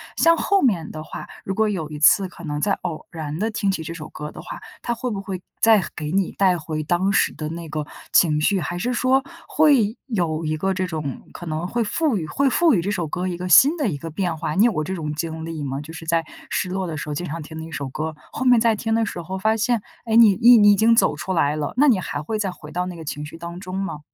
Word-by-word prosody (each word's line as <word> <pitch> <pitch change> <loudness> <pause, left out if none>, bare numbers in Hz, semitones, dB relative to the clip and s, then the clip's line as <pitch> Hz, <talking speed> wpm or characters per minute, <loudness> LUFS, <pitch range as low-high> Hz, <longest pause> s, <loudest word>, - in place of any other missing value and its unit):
像 335 0 +4
后 395 +3 +2
面 190 -11 +1
的 155 - -7
话， 155 - -8 0.2
如 195 - -3
果 220 +2 +2
有 180 -7 -3
一 150 -1 -7
次 185 +5 +5
可 175 -1 -11
能 150 -1 -3
再 200 - +1
偶 160 -3 -4
然 155 -3 -5
地 220 +5 -1
听 200 -2 -1
起 165 -4 -3
这 165 +1 -6
首 155 -2 -8
歌 150 0 -7
的 - - -10
话， - - -8 0.2
它 240 - -1
会 245 +1 -3
不 200 - -3
会 190 -2 -5 0.2
再 220 -4 +5
给 150 -2 -4
你 195 -2 +1
带 185 -2 +3
回 155 -1 -4
当 175 +5 +1
时 200 - +2
的 155 -1 -5
那 165 +1 -6
个 155 -1 -4 0.3
情 155 -4 +5
绪， 190 +5 +2
还 175 - -3
是 245 +6 -1
说， 260 +2 +3 0.3
会 265 -8 +3
有 170 - -1
一 155 0 0
个 190 +5 0
这 185 0 -1
种 155 -6 -5
可 175 - -8
能 160 +1 -3
会 235 +5 0
赋 290 +5 0
予 175 -6 -2
会 270 - +1
赋 330 +3 +4
予 185 - +2
这 190 - -3
首 185 -5 -1
歌 180 +4 -3
一 180 - -2
个 180 +1 -5
新 275 - +7
的 290 -9 0
一 150 - -3
个 165 +4 -7
变 170 0 -2
化， 150 0 -3
你 200 - +5
有 240 - +4
过 155 - -1
这 190 - -3
种 150 -4 -4
经 160 +1 -4
历 165 -1 -5
吗？ 135 +1 -3
就 150 +2 -10
是 165 0 -9
在 165 0 +1 0.3
失 185 - -1
落 190 0 -2
的 160 - -4
时 150 0 -5
候 - - -2
经 175 - -3
常 165 0 -5
听 160 +1 -9
的 160 - -6
一 165 - -11
首 140 -3 -4
歌， 155 +3 -4 0.2
后 - - -4
面 250 -2 +6
再 225 -1 +3
听 225 +1 -2
的 225 0 +2
时 180 -4 -5
候 185 +3 -5
发 220 +3 +1
现， 235 0 +1 0.2
诶， 225 -1 0
你 220 -4 +7
你 240 +5 +7
你 205 -1 +7
已 - - +5
经 225 +3 +4
走 - - +3
出 190 - -4
来 150 -4 +2
了， 150 -2 -3
那 290 +3 +5
你 230 -8 +4
还 145 -5 -4
会 215 +9 -3
再 195 -3 -1
回 150 -4 -12
到 180 +2 -1
那 180 -1 -6
个 165 - -9
情 150 -1 -5
绪 150 - -10
当 170 +1 -7
中 185 -1 -7
吗？ 195 -6 -3
180 Hz, 305 characters per minute, -22 LUFS, 155-215 Hz, 0.3 s, 新